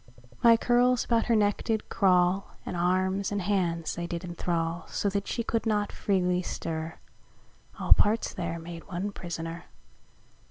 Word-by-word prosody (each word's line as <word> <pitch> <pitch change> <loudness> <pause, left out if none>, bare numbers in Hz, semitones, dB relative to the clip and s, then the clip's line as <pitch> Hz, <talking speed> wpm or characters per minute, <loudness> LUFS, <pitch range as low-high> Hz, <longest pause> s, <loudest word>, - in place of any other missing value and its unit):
My 230 -1 +7
curles 245 +1 +3
about 230 -1 +1
her 235 - +3
neck 205 -1 +2
did 220 -2 -1
craule, 185 -1 +3 0.2
And - - -4
armes 185 +3 +1
and 205 - -1
hands 175 -4 0
they 170 0 -4
did 170 +1 -4
enthrall: 170 -1 -2
So 200 - -1
that 200 0 -2
she 235 - -2
could 230 0 -1
not 210 -1 +1
freely 180 -2 +1
stir, 160 -2 -4 0.8
(All - - +7
parts 215 +2 +1
there 170 -2 -3
made 165 0 -9
one 190 +2 -3
prisoner.) 165 -3 -6
185 Hz, 155 wpm, -28 LUFS, 170-205 Hz, 0.8 s, My